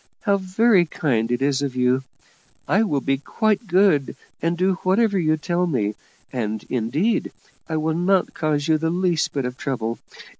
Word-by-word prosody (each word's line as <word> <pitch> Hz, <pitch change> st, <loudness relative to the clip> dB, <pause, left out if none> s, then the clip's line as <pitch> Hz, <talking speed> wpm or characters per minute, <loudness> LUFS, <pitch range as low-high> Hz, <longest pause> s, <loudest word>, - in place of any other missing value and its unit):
How 200 Hz, -2 st, +2 dB
very 190 Hz, 0 st, +3 dB
kind 120 Hz, -7 st, -1 dB
it 120 Hz, +2 st, 0 dB
is 140 Hz, 0 st, +1 dB
of 140 Hz, -3 st, -3 dB
you! 125 Hz, +1 st, +2 dB, 0.7 s
I 200 Hz, -, +3 dB
will 150 Hz, -11 st, 0 dB
be 135 Hz, 0 st, 0 dB
quite 215 Hz, -, 0 dB
good, 180 Hz, -6 st, +3 dB, 0.3 s
and 170 Hz, +1 st, 0 dB
do 185 Hz, +1 st, +1 dB
whatever 200 Hz, +1 st, +2 dB
you 155 Hz, -2 st, +2 dB
tell 175 Hz, +3 st, -1 dB
me; 110 Hz, -9 st, 0 dB, 0.4 s
and, 110 Hz, -4 st, -3 dB
indeed, 135 Hz, -, 0 dB, 0.4 s
I 160 Hz, -, -1 dB
will 155 Hz, +1 st, 0 dB
not 180 Hz, +3 st, +1 dB
cause 150 Hz, -2 st, -1 dB
you 160 Hz, -1 st, +3 dB
the 160 Hz, +1 st, 0 dB
least 175 Hz, -1 st, 0 dB
bit 140 Hz, -3 st, -2 dB
of 125 Hz, 0 st, -5 dB
trouble. 115 Hz, -4 st, -3 dB
155 Hz, 175 wpm, -22 LUFS, 130-185 Hz, 0.7 s, very